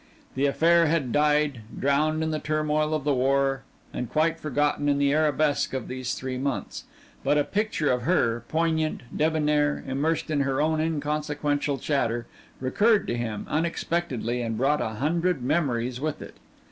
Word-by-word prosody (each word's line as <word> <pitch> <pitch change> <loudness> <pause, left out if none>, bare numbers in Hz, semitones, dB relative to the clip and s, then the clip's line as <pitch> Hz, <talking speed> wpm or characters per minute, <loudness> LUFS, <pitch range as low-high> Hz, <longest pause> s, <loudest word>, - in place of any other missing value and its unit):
The 140 +2 +1
affair 170 +3 +4
had 150 -6 0
died, 150 -3 +2 0.2
drowned 155 +3 +1
in 160 - -1
the 155 - -1
turmoil 155 0 0
of 150 - -3
the 145 0 +2
war 135 +1 +1 0.3
and 125 - -4
quite 165 +1 +1
forgotten 145 0 0
in 140 - +2
the 140 0 +2
arabesque 150 -2 +1
of 130 - -4
these 130 -1 -3
three 130 -1 -4
months, 130 -7 -3 0.4
but 150 - +2
a 145 - +3
picture 205 -7 0
of 125 -1 0
her, 120 -7 +1
poignant, 160 -1 0
debonnaire, 150 -1 +1
immersed 150 +4 -1
in 150 - +1
her 135 -1 0
own 155 +1 +1
inconsequential 150 -2 -1
chatter, 120 -4 -1 0.3
recurred 205 - +2
to 120 - 0
him 115 -3 -4
unexpectedly 155 -6 -1
and 115 -2 -2
brought 140 +5 +2
a - - -1
hundred 165 +2 0
memories 125 -4 0
with 155 0 -2
it. - - -11
145 Hz, 160 wpm, -26 LUFS, 130-155 Hz, 0.4 s, affair